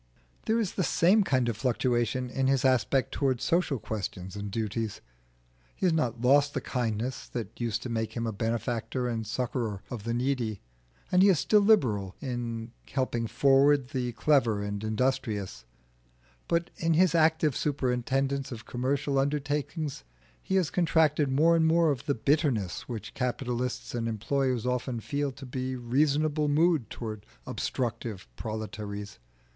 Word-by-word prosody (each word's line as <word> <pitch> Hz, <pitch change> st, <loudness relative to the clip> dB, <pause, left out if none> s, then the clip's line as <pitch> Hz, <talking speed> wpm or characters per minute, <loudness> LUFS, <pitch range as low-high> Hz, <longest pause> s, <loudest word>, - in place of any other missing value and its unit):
There 225 Hz, +1 st, +3 dB
is 210 Hz, -5 st, -1 dB
the 185 Hz, -, 0 dB
same 190 Hz, +6 st, +4 dB
kind 130 Hz, -8 st, +1 dB
of 120 Hz, -, 0 dB
fluctuation 125 Hz, 0 st, 0 dB
in 135 Hz, 0 st, 0 dB
his 135 Hz, 0 st, +2 dB
aspect 130 Hz, 0 st, +2 dB
towards 130 Hz, -4 st, 0 dB
social 170 Hz, -5 st, +1 dB
questions 100 Hz, -4 st, -5 dB
and 100 Hz, 0 st, -5 dB
duties. 110 Hz, 0 st, -3 dB, 0.8 s
He -, -, -2 dB
has 175 Hz, -, +4 dB
not 120 Hz, -8 st, 0 dB
lost 145 Hz, +3 st, +4 dB
the -, -, +1 dB
kindness 120 Hz, 0 st, -2 dB
that 115 Hz, -1 st, -6 dB
used 115 Hz, -1 st, -1 dB
to 130 Hz, -, -5 dB
make 110 Hz, -1 st, -2 dB
him 115 Hz, -1 st, -2 dB
a 115 Hz, -, -1 dB
benefactor 115 Hz, +3 st, -2 dB
and 115 Hz, -2 st, -2 dB
succourer 115 Hz, -5 st, -2 dB
of 120 Hz, -5 st, -5 dB
the 115 Hz, +1 st, -1 dB
needy, 120 Hz, -5 st, -1 dB, 0.5 s
and 180 Hz, -, +5 dB
he 200 Hz, -, +7 dB
is 185 Hz, -, +4 dB
still 210 Hz, +8 st, +4 dB
liberal 115 Hz, -, +3 dB
in 120 Hz, -3 st, -4 dB, 0.2 s
helping 125 Hz, -3 st, -1 dB
forward 135 Hz, +3 st, +4 dB
the 125 Hz, -3 st, -2 dB
clever 120 Hz, -5 st, +2 dB
and 100 Hz, 0 st, -4 dB
industrious; 110 Hz, -, -1 dB, 0.8 s
but 170 Hz, 0 st, 0 dB
in 165 Hz, -1 st, +1 dB
his 180 Hz, 0 st, +4 dB
active 160 Hz, -3 st, +3 dB
superintendence 135 Hz, 0 st, 0 dB
of 115 Hz, -2 st, -7 dB
commercial 135 Hz, +3 st, 0 dB
undertakings 145 Hz, -, -2 dB, 0.4 s
he 190 Hz, -, -2 dB
has 185 Hz, -5 st, +2 dB
contracted 155 Hz, -4 st, +3 dB
more 155 Hz, +5 st, +4 dB
and 160 Hz, -1 st, +3 dB
more 165 Hz, -1 st, +4 dB
of 135 Hz, -1 st, -4 dB
the 140 Hz, -, +2 dB
bitterness 130 Hz, -, 0 dB
which 110 Hz, -4 st, -6 dB
capitalists 125 Hz, -1 st, -2 dB
and 115 Hz, -1 st, -1 dB
employers 125 Hz, +2 st, 0 dB
often 125 Hz, -1 st, -1 dB
feel 140 Hz, +4 st, -2 dB
to 135 Hz, +1 st, -10 dB
be 130 Hz, 0 st, -3 dB
a -, -, -4 dB
reasonable 150 Hz, +5 st, +1 dB
mood 155 Hz, -3 st, +2 dB
towards 110 Hz, -3 st, -6 dB, 0.2 s
obstructive 115 Hz, -, -3 dB
proletaries. 105 Hz, -, -6 dB
125 Hz, 155 wpm, -28 LUFS, 115-145 Hz, 0.8 s, he